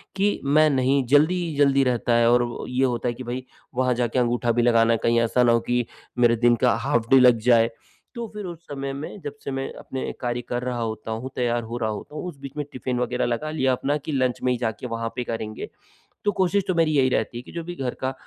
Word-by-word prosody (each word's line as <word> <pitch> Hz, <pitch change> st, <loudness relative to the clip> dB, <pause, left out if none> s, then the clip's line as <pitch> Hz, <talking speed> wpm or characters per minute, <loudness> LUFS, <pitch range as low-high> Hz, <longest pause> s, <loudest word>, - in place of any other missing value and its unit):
कि 200 Hz, +1 st, +1 dB
मैं 155 Hz, +2 st, +5 dB
नहीं 135 Hz, 0 st, +2 dB
जल्दी 150 Hz, +7 st, +4 dB
ही 160 Hz, -3 st, -4 dB
जल्दी 140 Hz, -1 st, +4 dB
रहता 125 Hz, -1 st, +1 dB
है 115 Hz, 0 st, +4 dB
और 120 Hz, 0 st, +4 dB
वो 120 Hz, -1 st, -5 dB
ये 125 Hz, +1 st, +1 dB
होता 125 Hz, -1 st, -1 dB
है 120 Hz, -, 0 dB
कि 130 Hz, -, -8 dB
भाई 125 Hz, +1 st, -5 dB, 0.3 s
वहाँ 125 Hz, 0 st, +2 dB
जाके 120 Hz, +1 st, 0 dB
अंगूठा 120 Hz, 0 st, +1 dB
भी 120 Hz, +1 st, +2 dB
लगाना 115 Hz, -1 st, +4 dB
है, -, -, +2 dB
कहीं 115 Hz, 0 st, +3 dB
ऐसा 115 Hz, +2 st, +2 dB
न 120 Hz, -, +4 dB
हो 115 Hz, 0 st, +4 dB
कि 120 Hz, +1 st, -1 dB, 0.3 s
मेरे 120 Hz, -1 st, +5 dB
दिन 120 Hz, +1 st, +4 dB
का -, -, +5 dB
हाफ 115 Hz, 0 st, -1 dB
डे 135 Hz, -, +7 dB
लग 125 Hz, -2 st, +6 dB
जाए। 115 Hz, -1 st, +5 dB, 0.5 s
तो 235 Hz, -1 st, -4 dB
फिर 210 Hz, -1 st, -5 dB
उस 170 Hz, -2 st, -7 dB
समय 135 Hz, -1 st, -4 dB
में 145 Hz, +8 st, -7 dB
जब 145 Hz, -, -5 dB
से -, -, -4 dB
मैं 135 Hz, 0 st, -3 dB
अपने 130 Hz, -, -5 dB
कार्य 120 Hz, 0 st, -2 dB
कर 120 Hz, 0 st, -2 dB
रहा 125 Hz, -1 st, -2 dB
होता 110 Hz, -1 st, -4 dB
हूँ, 115 Hz, +4 st, -4 dB
तैयार 120 Hz, -1 st, 0 dB
हो 115 Hz, +2 st, -5 dB
रहा 110 Hz, -2 st, -1 dB
होता 110 Hz, +7 st, -7 dB
हूँ, -, -, -4 dB
उस 170 Hz, -5 st, -8 dB
बीच 140 Hz, -1 st, -7 dB
में 150 Hz, -, -2 dB
टिफ़िन 125 Hz, -1 st, -3 dB
वगैरह 125 Hz, 0 st, 0 dB
लगा 120 Hz, +6 st, -2 dB
लिया 135 Hz, -4 st, +1 dB
अपना 140 Hz, +3 st, 0 dB
कि 150 Hz, +1 st, -6 dB
लंच 130 Hz, -3 st, 0 dB
में 125 Hz, -, +2 dB
ही 125 Hz, -, 0 dB
जाके 115 Hz, 0 st, -3 dB
वहाँ 115 Hz, -1 st, -3 dB
पे 125 Hz, -, -2 dB
करेंगे। 110 Hz, -2 st, -5 dB, 0.6 s
तो 205 Hz, -, +3 dB
कोशिश 190 Hz, +2 st, +2 dB
तो 185 Hz, -, 0 dB
मेरी 165 Hz, -2 st, +3 dB
यही 130 Hz, -1 st, +4 dB
रहती 120 Hz, -1 st, -1 dB
है -, -, -5 dB
कि -, -, -13 dB
जो 170 Hz, -, -5 dB
भी 175 Hz, +1 st, -7 dB
घर 130 Hz, -6 st, -3 dB
का 130 Hz, 0 st, 0 dB
125 Hz, 265 wpm, -24 LUFS, 120-140 Hz, 0.6 s, डे